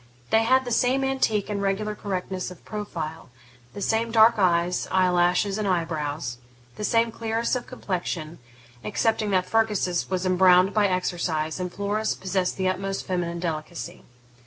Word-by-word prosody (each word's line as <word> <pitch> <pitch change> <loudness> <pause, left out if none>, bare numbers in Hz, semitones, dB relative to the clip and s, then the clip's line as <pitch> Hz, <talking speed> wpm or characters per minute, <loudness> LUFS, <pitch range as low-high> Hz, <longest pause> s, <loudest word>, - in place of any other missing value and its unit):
They 225 0 +4
had 260 +2 +4
the 245 - -4
same 255 +3 +2
antique 260 -6 +1
and 205 -1 -2
regular 200 +2 -1
correctness 190 -3 -4
of 180 - -13
profile; 165 -8 -5 0.5
the 200 - -4
same 225 +3 +1
dark 225 0 +5
eyes, 175 -1 +2
eye 185 -1 +3
lashes, 180 +3 +2
and 210 - -1
eye 175 -3 +1
brows; 150 -6 -4 0.4
the - - -6
same 230 +1 +2
clearness 225 +2 -1
of 250 - -4
complexion, 175 -8 -4 0.4
excepting 215 - 0
that 185 -2 +2
Fergus's 210 -5 0
was 185 0 -1
embrowned 185 +1 +5
by 210 -2 +3
exercise 175 -3 -1
and 180 -1 -3
Flora's 205 +3 -1
possessed 185 -1 -1
the 190 -1 0
utmost 195 +1 -2
feminine 175 -2 -2
delicacy. 170 +1 -5
190 Hz, 160 wpm, -25 LUFS, 175-215 Hz, 0.5 s, dark